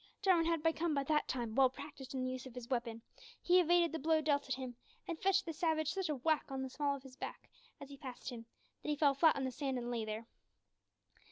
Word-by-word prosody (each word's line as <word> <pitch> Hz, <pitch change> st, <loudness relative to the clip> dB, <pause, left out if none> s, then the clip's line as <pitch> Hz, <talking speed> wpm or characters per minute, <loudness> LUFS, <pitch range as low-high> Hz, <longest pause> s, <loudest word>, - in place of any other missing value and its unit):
Jarwin 350 Hz, -4 st, +4 dB
had 330 Hz, -2 st, +1 dB
become 325 Hz, -1 st, +1 dB
by 280 Hz, -, +1 dB
that 300 Hz, +2 st, +1 dB
time 235 Hz, -4 st, -2 dB
well 265 Hz, +1 st, +5 dB
practised 270 Hz, -1 st, -9 dB
in 255 Hz, -, -1 dB
the 255 Hz, -, -1 dB
use 255 Hz, 0 st, -5 dB
of 255 Hz, -, -12 dB
his 250 Hz, 0 st, -8 dB
weapon; 235 Hz, -2 st, -2 dB, 0.4 s
he 360 Hz, +1 st, +5 dB
evaded 345 Hz, -1 st, +4 dB
the 325 Hz, -, -3 dB
blow 315 Hz, +2 st, +3 dB
dealt 290 Hz, -2 st, +1 dB
at 260 Hz, -, +1 dB
him, 255 Hz, -2 st, -6 dB, 0.3 s
and 335 Hz, -3 st, -4 dB
fetched 390 Hz, 0 st, +3 dB
the 330 Hz, -, -4 dB
savage 315 Hz, -2 st, +1 dB
such 385 Hz, -4 st, -2 dB
a 300 Hz, -, +1 dB
whack 310 Hz, +4 st, +1 dB
on 265 Hz, -1 st, -3 dB
the 260 Hz, -, -5 dB
small 285 Hz, 0 st, 0 dB
of 270 Hz, -, -10 dB
his 265 Hz, -1 st, -12 dB
back -, -, -7 dB, 0.3 s
as 280 Hz, -, -8 dB
he 280 Hz, -, -9 dB
passed 260 Hz, -2 st, -7 dB
him, 230 Hz, -2 st, -8 dB, 0.3 s
that -, -, -5 dB
he 300 Hz, -, +2 dB
fell 290 Hz, -1 st, +4 dB
flat 310 Hz, +3 st, +5 dB
on 275 Hz, -, -2 dB
the 260 Hz, -, -1 dB
sand 270 Hz, 0 st, -2 dB
and 240 Hz, 0 st, -3 dB
lay 230 Hz, -2 st, -1 dB
there. 215 Hz, +1 st, -4 dB
280 Hz, 255 wpm, -36 LUFS, 255-320 Hz, 0.4 s, well